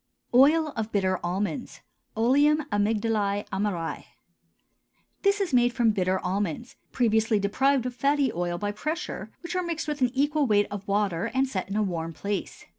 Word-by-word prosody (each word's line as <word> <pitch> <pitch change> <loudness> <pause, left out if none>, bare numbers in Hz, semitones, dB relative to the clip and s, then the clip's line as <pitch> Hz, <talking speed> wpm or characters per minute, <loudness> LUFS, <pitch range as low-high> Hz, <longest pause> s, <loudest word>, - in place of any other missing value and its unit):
OIL 300 +5 +5
OF 220 -1 -3
BITTER 185 -3 +1
ALMONDS 195 +8 -3 0.4
(OLEUM 290 +6 +4
AMYGDALÆ 205 -1 0
AMARÆ). 190 -4 -2 1.2
This 400 +1 +2
is 385 -8 -1
made 245 -1 +4
from 235 -3 +3
bitter 185 -2 0
almonds, 195 - -3 0.2
previously 220 -2 +2
deprived 255 +6 +1
of 250 - -3
fatty 280 0 +1
oil 175 0 -2
by 205 +3 -2
pressure, 310 +11 -4
which 340 +1 -5
are 365 - +1
mixed 335 -3 -3
with 300 -2 -3
an 250 - +4
equal 290 +1 +2
weight 205 -2 +3
of 205 -1 -6
water 200 -4 0
and 265 +1 +2
set 190 -7 -4
in 195 - -3
a 215 - +2
warm 165 -4 -3
place. 200 +4 -4
220 Hz, 165 wpm, -26 LUFS, 200-275 Hz, 1.2 s, OIL